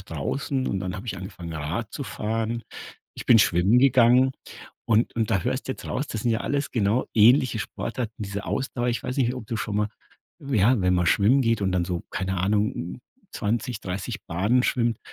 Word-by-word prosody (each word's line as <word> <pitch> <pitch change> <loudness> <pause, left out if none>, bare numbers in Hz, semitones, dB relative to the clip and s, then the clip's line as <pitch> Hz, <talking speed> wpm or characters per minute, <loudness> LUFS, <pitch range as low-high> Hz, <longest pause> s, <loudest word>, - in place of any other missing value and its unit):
draußen 115 - -3
und 95 - -1
dann 90 -1 -4
habe 105 +6 -8
ich 105 - -3
angefangen, 90 -2 -8
Rad 80 +9 -4
zu 140 - -5
fahren. 115 +1 -2 0.5
Ich - - -8
bin 115 - +7
schwimmen 95 +5 +4
gegangen 130 0 +5 0.5
und 115 +1 +2
und 110 -2 0
da 95 - +2
hörst 130 +2 -2
du - - +1
jetzt - - -11
raus, 140 - -2
das 110 - -5
sind 120 - +1
ja 115 0 0
alles 145 +1 -1
genau 110 +2 +1
ähnliche 120 +2 +5
Sportarten, 115 +2 -4
diese 100 0 -5
Ausdauer. 125 -2 -2
Ich 120 - -1
weiß 125 - -4
nicht, 125 -2 +1
ob 125 -4 -8
du 115 -1 -3
schon 105 -1 -3
mal 105 0 +1 0.5
ja, 125 -3 +2
wenn 90 0 +2
man 90 -1 +1
schwimmen 110 +9 +4
geht 115 -2 +1
und 95 -1 +1
dann 90 -1 +1
so, 85 -1 -3
keine 95 0 -2
Ahnung, 105 0 -1 0.3
20, 115 +1 -2
30 90 0 -5
Bahnen 105 +9 +2
schwimmt 120 -3 +1
110 Hz, 200 wpm, -25 LUFS, 95-125 Hz, 0.5 s, bin